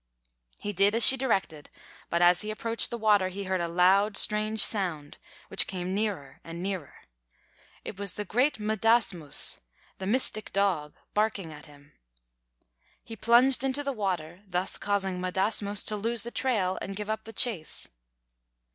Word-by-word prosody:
He 205 - -5
did 200 +3 +3
as 230 - +7
she 265 - +9
directed; 190 - -2 0.4
but 170 +1 +1
as 175 0 +4
he 210 - -6
approached 230 +2 -2
the 235 - -4
water, 210 -4 +2
he 195 +2 -6
heard 190 -1 -2
a 170 - -2
loud, 190 +4 +3
strange 215 +1 +3
sound, 170 -9 +1 0.3
which - - +2
came 185 -1 -4
nearer 195 -9 -4
and 165 +1 -8
nearer. 190 -6 -6 0.8
It 195 - -8
was 200 -3 -2
the 210 - -4
great 255 +8 +1
M'dāsmūs, 215 - 0 0.4
the 190 - -5
mystic 215 -2 -1
dog, 185 -7 -1 0.2
barking 210 -6 -1
at 150 - -13
him. 145 0 -19 1.1
He 225 - -9
plunged 240 +5 +4
into 270 +2 -1
the 280 -1 -2
water, 180 -5 -4
thus 180 0 -1
causing 195 -2 -2
M'dāsmūs 200 +2 -1
to 215 - 0
lose 225 +2 -1
the 235 - -7
trail 210 -10 -1
and 195 - -6
give 210 +1 -6
up 220 - -5
the 225 - -9
chase. 210 -12 -2
200 Hz, 160 wpm, -27 LUFS, 180-220 Hz, 1.1 s, she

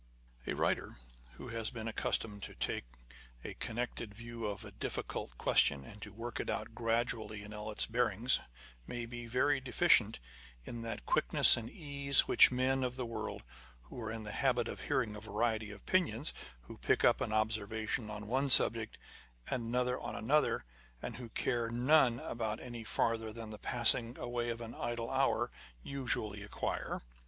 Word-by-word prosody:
A - - -1
writer - - 0 0.4
who - - -9
has 115 -1 -2
been 115 -2 -6
accustomed 105 -2 -1
to - - -8
take - - -2 0.6
a - - -5
connected 120 -2 -4
view 115 0 -5
of 105 +2 -5
a 105 - -9
difficult - - -4
question 70 -1 +3
and 105 +7 -12
to 105 - -7
work 115 +3 -5
it - - -3
out - - -3
gradually 115 -2 -1
in 105 +1 -9
all 105 0 -6
its 105 - +1
bearings, 115 +1 +1 0.5
may 120 -1 -4
be 120 0 -7
very 135 +4 +2
deficient 125 -5 +4 0.5
in 115 - -6
that 115 0 -5
quickness - - +6
and 115 -1 -5
ease 140 -3 +2
which - - +8
men 130 +1 +1
of 125 -1 -2
the 130 -1 -3
world, 115 - -5 0.4
who 60 - -9
are 110 -1 -3
in 115 -1 -5
the 105 - -6
habit 125 -2 +1
of - - -6
hearing 125 -7 0
a 105 - -8
variety 110 0 -1
of 105 - -8
opinions, 155 -8 +1 0.3
who - - -12
pick - - +2
up - - +4
an - - -1
observation 110 0 -1
on 105 0 -6
one 135 +5 0
subject, 115 -3 +6 0.5
and 120 -3 -1
another 125 +2 0
on - - -5
another, 130 - +2 0.3
and - - -6
who 125 -2 -8
care 120 +1 0
about 115 - -6
none 120 -5 +2
any 120 -2 -7
farther 115 0 0
than 115 -1 -7
the 105 - -8
passing 120 0 +2
away 120 -1 -2
of 115 0 -3
an 115 0 -7
idle 120 0 -3
hour, 135 0 +2 0.3
usually 110 -6 -1
acquire. 100 - -3
115 Hz, 175 wpm, -34 LUFS, 110-125 Hz, 0.6 s, which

